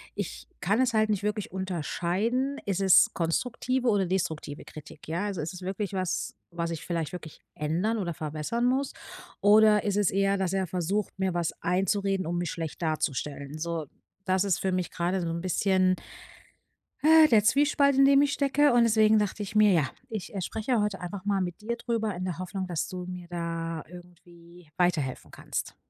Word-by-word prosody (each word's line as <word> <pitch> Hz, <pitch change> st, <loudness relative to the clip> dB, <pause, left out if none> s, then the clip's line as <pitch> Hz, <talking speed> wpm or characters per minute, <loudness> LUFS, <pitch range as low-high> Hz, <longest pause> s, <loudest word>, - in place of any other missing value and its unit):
ich -, -, -5 dB
kann 205 Hz, +6 st, +1 dB
es 255 Hz, -2 st, +1 dB
halt 215 Hz, 0 st, +3 dB
nicht 205 Hz, -1 st, 0 dB
wirklich 210 Hz, 0 st, -2 dB
unterscheiden: 190 Hz, -, -1 dB
Ist 195 Hz, -1 st, -1 dB
es 190 Hz, -2 st, +6 dB
konstruktive 245 Hz, +9 st, -1 dB
oder 200 Hz, -3 st, +2 dB
destruktive 160 Hz, -5 st, -3 dB
Kritik? 155 Hz, -, -12 dB
Ja, 180 Hz, +6 st, -2 dB
ist 195 Hz, -, -5 dB, 0.2 s
es 180 Hz, -, -9 dB
wirklich 195 Hz, +1 st, -3 dB
was, 185 Hz, -1 st, -2 dB, 0.2 s
was 170 Hz, 0 st, -3 dB
ich 165 Hz, -, -6 dB
vielleicht 165 Hz, -3 st, -2 dB
wirklich 160 Hz, -4 st, -9 dB
ändern 175 Hz, +10 st, 0 dB
oder 175 Hz, -5 st, -2 dB
verbessern 155 Hz, +11 st, -2 dB
muss? 265 Hz, +2 st, +1 dB, 0.5 s
Oder 210 Hz, 0 st, +6 dB
ist 205 Hz, 0 st, 0 dB
es 205 Hz, -3 st, +2 dB
eher, 195 Hz, +1 st, +2 dB
dass 190 Hz, -1 st, -1 dB
er 190 Hz, -2 st, 0 dB
versucht, 185 Hz, +4 st, -2 dB
mir 190 Hz, -2 st, 0 dB
was 170 Hz, -2 st, 0 dB
einzureden, 195 Hz, +1 st, 0 dB
um 175 Hz, +1 st, -1 dB
mich 175 Hz, -3 st, -2 dB
schlecht 165 Hz, 0 st, -5 dB
darzustellen, 150 Hz, -2 st, -2 dB
so, 165 Hz, -2 st, -3 dB, 0.4 s
das 185 Hz, +1 st, +2 dB
ist 190 Hz, -, +1 dB
für 190 Hz, -, 0 dB
mich 180 Hz, -1 st, -1 dB
gerade 180 Hz, +2 st, -1 dB
so 170 Hz, -, -2 dB
'n 170 Hz, +1 st, -3 dB
bisschen 185 Hz, 0 st, +2 dB, 1.1 s
äh, 315 Hz, +1 st, +7 dB
der 215 Hz, -3 st, +5 dB
Zwiespalt, 280 Hz, +3 st, +3 dB
in 275 Hz, -, +7 dB
dem 275 Hz, 0 st, +6 dB
ich 285 Hz, 0 st, +2 dB
stecke 285 Hz, -1 st, +3 dB
und 240 Hz, -1 st, +5 dB
deswegen 220 Hz, -1 st, +4 dB
dachte 205 Hz, 0 st, -2 dB
ich 205 Hz, -, -8 dB
mir 210 Hz, -1 st, +6 dB
ja, 155 Hz, -7 st, +2 dB, 0.2 s
ich, 215 Hz, -2 st, -6 dB
äh, 195 Hz, -, -3 dB
spreche 220 Hz, +4 st, -1 dB
heute 210 Hz, -2 st, -1 dB
einfach 185 Hz, +2 st, -6 dB
mal 200 Hz, -2 st, +1 dB
mit 180 Hz, +3 st, -4 dB
dir 235 Hz, +2 st, -2 dB
darüber 225 Hz, -4 st, -2 dB
in 185 Hz, +1 st, -4 dB
der 180 Hz, -1 st, -4 dB
Hoffnung, 185 Hz, +1 st, -4 dB
dass 170 Hz, -3 st, -2 dB
du 180 Hz, -1 st, -6 dB
mir 180 Hz, -1 st, -7 dB
da 165 Hz, -2 st, -4 dB
irgendwie 175 Hz, -1 st, -15 dB
weiterhelfen 155 Hz, -8 st, 0 dB
kannst. -, -, -5 dB
190 Hz, 190 wpm, -28 LUFS, 170-215 Hz, 1.1 s, äh